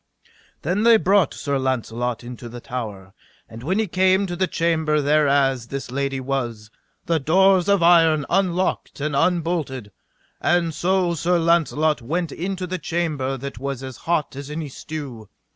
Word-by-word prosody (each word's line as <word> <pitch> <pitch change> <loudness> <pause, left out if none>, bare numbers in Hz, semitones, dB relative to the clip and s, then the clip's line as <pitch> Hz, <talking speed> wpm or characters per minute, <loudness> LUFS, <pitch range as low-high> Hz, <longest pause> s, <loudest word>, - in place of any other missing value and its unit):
Then 180 +7 0
they 230 0 +6
brought 195 -5 +3
Sir 140 -1 -2
Launcelot 125 -2 -2
into 120 0 -8
the 120 +1 -8
tower; 105 -7 -6 0.3
and 115 +1 -11
when 175 +10 -1
he 220 - +2
came 190 +1 +2
to 175 -2 -4
the 185 +1 0
chamber 160 -2 +1
thereas 140 -4 +2
this 135 -1 -6
lady 135 0 -2
was, 120 -5 -3 0.3
the 165 -1 +1
doors 185 +5 +4
of 200 -4 +3
iron 165 -3 +5
unlocked 185 -4 0
and 145 0 -2
unbolted. 165 - 0 0.5
And 175 -2 +2
so 180 +2 +1
Sir 175 +2 +1
Launcelot 160 -3 +2
went 165 +6 -2
into 185 +2 -4
the 180 0 -4
chamber 150 -6 -2
that 135 -2 -7
was 135 -1 -4
as 130 -1 -7
hot 160 -5 -1
as 140 +1 -7
any 150 0 -5
stew. 130 -7 -8
155 Hz, 160 wpm, -22 LUFS, 130-175 Hz, 0.5 s, they